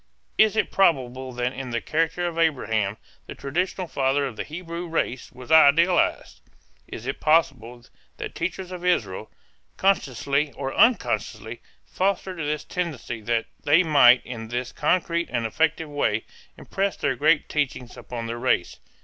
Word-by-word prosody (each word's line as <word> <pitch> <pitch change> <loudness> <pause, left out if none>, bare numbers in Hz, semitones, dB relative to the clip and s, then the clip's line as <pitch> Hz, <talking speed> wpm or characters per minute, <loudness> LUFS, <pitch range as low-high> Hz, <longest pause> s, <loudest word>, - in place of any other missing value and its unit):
Is 220 -1 +5
it 220 - 0
probable 130 -8 +1
that 125 +1 -2
in 130 -1 -6
the 120 -1 -1
character 165 +5 -1
of 170 -1 -3
Abraham 110 -10 0 0.3
the - - -8
traditional 180 +6 -2
father 140 -1 0
of 130 -5 -5
the - - -4
Hebrew 170 +2 -6
race 160 -6 -2
was 125 +3 -11
idealized? 160 +3 +4 0.5
Is 115 - -8
it 135 - -4
possible 125 -7 +1 0.3
that - - -6
teachers 185 +2 -4
of 180 -1 -7
Israel, 110 - 0 0.5
consciously 140 - +1
or 135 -1 -4
unconsciously, 245 -1 +1 0.2
fostered 190 -1 -2
this 150 -1 -2
tendency 150 -10 -4
that 115 +1 0 0.2
they 155 +5 +5
might 130 -6 +6
in 115 -3 -7
this 120 +2 -4
concrete 170 +1 0
and 120 -2 -1
effective 160 +7 0
way 115 -7 0 0.3
impress 195 0 -2
their 130 - 0
great 150 +4 +2
teachings 130 -4 -3
upon 120 -2 -7
their 115 +1 -5
race? 85 - 0
145 Hz, 150 wpm, -24 LUFS, 125-170 Hz, 0.5 s, might